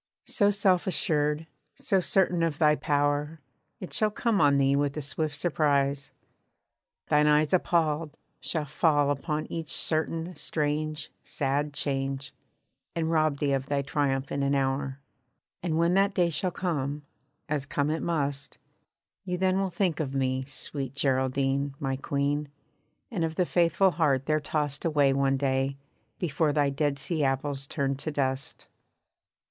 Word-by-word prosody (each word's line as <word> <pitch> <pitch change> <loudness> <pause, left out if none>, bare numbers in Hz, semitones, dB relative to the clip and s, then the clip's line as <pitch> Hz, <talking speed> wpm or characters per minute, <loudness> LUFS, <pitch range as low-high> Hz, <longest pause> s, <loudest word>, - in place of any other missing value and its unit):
So 205 -1 +2
self 195 -3 +2
assured, 150 -4 +1 0.3
so 195 - +1
certain 180 -1 +2
of 165 -3 0
thy 150 -1 +4
power, 145 +2 0 0.4
It 185 - -7
shall 215 - +3
come 215 -2 0
on 140 -1 +5
thee 135 0 +3
with 145 +1 0
a - - -1
swift 150 +1 -3
surprise. 140 -3 +1 1.0
Thine 150 0 +4
eyes 150 +1 +3
Appalled, 165 -4 +1 0.2
shall 155 -3 -1
fall 145 -1 +2
upon 150 +2 -2
each 165 -2 -4
certain, 165 +2 0
strange, 155 0 -2
sad 145 +2 -1
change, 135 -1 -2 0.6
And 165 -1 0
rob 155 -3 +2
thee 140 0 0
of 135 0 -1
thy 140 -1 0
triumph 140 -1 -1
in 140 - -1
an 140 0 +1
hour. 135 0 -1 0.6
And 165 -2 -1
when 170 +1 +3
that 195 +1 +3
day 175 -2 +2
shall 185 +4 0
come, 150 -5 -2 0.4
as 145 -2 -2
come 145 +1 0
it 160 - -2
must, 145 -4 -2 0.7
You 180 -1 -2
then 185 +1 +2
will 195 -1 0
think 175 -3 0
of 140 -3 -2
me, 130 -1 0
sweet 135 -1 -6
Geraldine, 135 0 +1
my 135 -1 -1
Queen, 140 +2 -1 0.6
And 190 -7 -1
of 160 -1 -2
the 180 - +2
faithful 175 +2 +3
heart 140 -6 +1
there 155 0 +2
tossed 145 -1 -2
away 145 -4 +3
one 135 0 +2
day, 135 0 0 0.4
Before 155 -2 0
thy 145 -1 +2
dead 140 0 0
sea 155 +2 -1
apples 135 0 -1
turned 140 -3 -1
to 155 - -3
dust. 135 -2 -2
145 Hz, 155 wpm, -28 LUFS, 140-165 Hz, 1.0 s, on